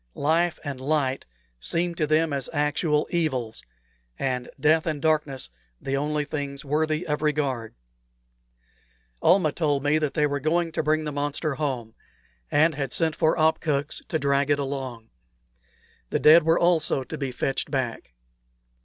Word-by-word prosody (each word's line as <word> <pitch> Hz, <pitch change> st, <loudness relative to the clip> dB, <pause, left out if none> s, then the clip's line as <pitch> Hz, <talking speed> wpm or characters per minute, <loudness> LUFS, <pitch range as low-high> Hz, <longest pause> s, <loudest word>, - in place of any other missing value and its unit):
Life 165 Hz, +3 st, +1 dB
and 140 Hz, -4 st, -5 dB
light 135 Hz, -2 st, 0 dB, 0.3 s
seemed 170 Hz, -, -1 dB
to 155 Hz, -, +1 dB
them 155 Hz, 0 st, +2 dB
as 140 Hz, -2 st, -2 dB
actual 150 Hz, 0 st, +1 dB
evils, 130 Hz, -10 st, -1 dB, 0.5 s
and 125 Hz, -2 st, -2 dB
death 160 Hz, +4 st, +3 dB
and 155 Hz, -2 st, -1 dB
darkness 150 Hz, -, 0 dB, 0.3 s
the 135 Hz, -, -2 dB
only 150 Hz, +1 st, -1 dB
things 140 Hz, -2 st, -5 dB
worthy 155 Hz, +3 st, 0 dB
of 150 Hz, -1 st, -2 dB
regard. 140 Hz, -7 st, -1 dB, 1.5 s
Almah 180 Hz, -5 st, +4 dB
told 145 Hz, -3 st, 0 dB
me 145 Hz, +2 st, +3 dB
that 150 Hz, -2 st, -2 dB
they 150 Hz, -2 st, +3 dB
were 145 Hz, -1 st, -1 dB
going 165 Hz, +3 st, 0 dB
to -, -, -1 dB
bring 155 Hz, 0 st, +1 dB
the 150 Hz, -, -3 dB
monster 145 Hz, +1 st, -2 dB
home, 130 Hz, -6 st, -3 dB, 0.6 s
and 155 Hz, +3 st, +4 dB
had 135 Hz, -3 st, -3 dB
sent 160 Hz, -2 st, +1 dB
for 160 Hz, 0 st, +2 dB
opkuks 155 Hz, -2 st, +1 dB
to 160 Hz, -, 0 dB
drag 140 Hz, -1 st, +1 dB
it 145 Hz, -, +3 dB
along. 135 Hz, -5 st, -5 dB, 1.0 s
The -, -, +1 dB
dead 160 Hz, +3 st, +8 dB
were 165 Hz, +1 st, +3 dB
also 165 Hz, -6 st, +2 dB
to 155 Hz, -, -7 dB
be 135 Hz, -3 st, -2 dB
fetched 135 Hz, +2 st, -2 dB
back. 125 Hz, -, -3 dB
150 Hz, 155 wpm, -25 LUFS, 135-155 Hz, 1.5 s, dead